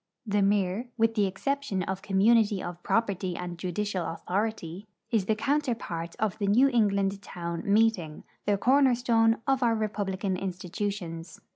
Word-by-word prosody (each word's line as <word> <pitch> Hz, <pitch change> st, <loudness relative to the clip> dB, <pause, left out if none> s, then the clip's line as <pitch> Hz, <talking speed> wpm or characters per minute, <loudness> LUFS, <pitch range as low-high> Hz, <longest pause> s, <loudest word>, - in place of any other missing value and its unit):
The 205 Hz, -1 st, +1 dB
mir, 200 Hz, +3 st, +1 dB
with 225 Hz, 0 st, +3 dB
the 210 Hz, -3 st, +2 dB
exception 210 Hz, 0 st, -2 dB
of 190 Hz, +1 st, -4 dB
community 205 Hz, +1 st, +3 dB
of 175 Hz, 0 st, -6 dB
property 195 Hz, -5 st, 0 dB
and 175 Hz, -1 st, -5 dB
judicial 185 Hz, +1 st, -2 dB
authority, 195 Hz, +1 st, -3 dB, 0.2 s
is 220 Hz, -5 st, +2 dB
the 220 Hz, -, +2 dB
counterpart 230 Hz, -, -2 dB
of 215 Hz, -2 st, -1 dB
the 200 Hz, -, 0 dB
New 245 Hz, +7 st, +5 dB
England 200 Hz, -5 st, +1 dB
town 170 Hz, -3 st, -5 dB
meeting, 205 Hz, -8 st, +2 dB, 0.2 s
the 205 Hz, -1 st, +3 dB
corner 260 Hz, +3 st, +4 dB
stone 225 Hz, -2 st, +3 dB
of 270 Hz, -1 st, +1 dB
our 235 Hz, -2 st, +3 dB
republican 200 Hz, -3 st, -2 dB
institutions. 180 Hz, -2 st, -5 dB
205 Hz, 145 wpm, -28 LUFS, 185-225 Hz, 0.2 s, New